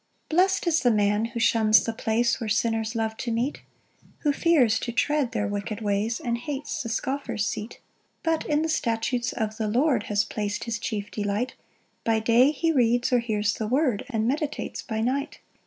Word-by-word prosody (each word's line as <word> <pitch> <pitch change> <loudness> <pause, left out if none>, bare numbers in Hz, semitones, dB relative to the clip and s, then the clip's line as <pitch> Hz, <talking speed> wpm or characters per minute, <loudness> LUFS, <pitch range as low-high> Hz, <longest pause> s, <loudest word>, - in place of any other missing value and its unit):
1 - - -1
Blest 380 +1 +3
is 330 -2 +3
the 245 - +3
man 210 0 +2
who 235 +1 -5
shuns 220 -1 +4
the 230 - -2
place 235 +2 0
Where 225 - -2
sinners 225 +1 0
love 220 -1 -1
to 235 - -3
meet; 240 +5 -1 0.6
Who 295 -2 +2
fears 275 -9 +3
to 235 - -3
tread 280 +1 +1
their 215 -4 -1
wicked 205 +1 -4
ways, 210 +2 -1
And 235 -1 -2
hates 290 +2 -4
the 230 - -5
scoffer's 235 -2 -2
seat: 215 +2 -4
2 - - -18 0.4
But 325 -1 0
in 300 +1 +2
the - - 0
statutes 240 -4 0
of 220 -1 -3
the 220 - -1
Lord 245 0 +2
Has 210 0 +2
plac'd 205 -1 -3
his 230 -1 -3
chief 205 -2 -4
delight; 210 +4 -2 0.5
By 225 -1 +2
day 235 +4 +5
he 325 +2 0
reads 245 -3 +2
or 245 - +5
hears 215 -2 0
the 220 - -3
word, 255 -3 +1
And 225 -3 0
meditates 295 +3 -2
by 220 -2 -3
night. 275 +5 -1
230 Hz, 195 wpm, -26 LUFS, 220-265 Hz, 0.6 s, day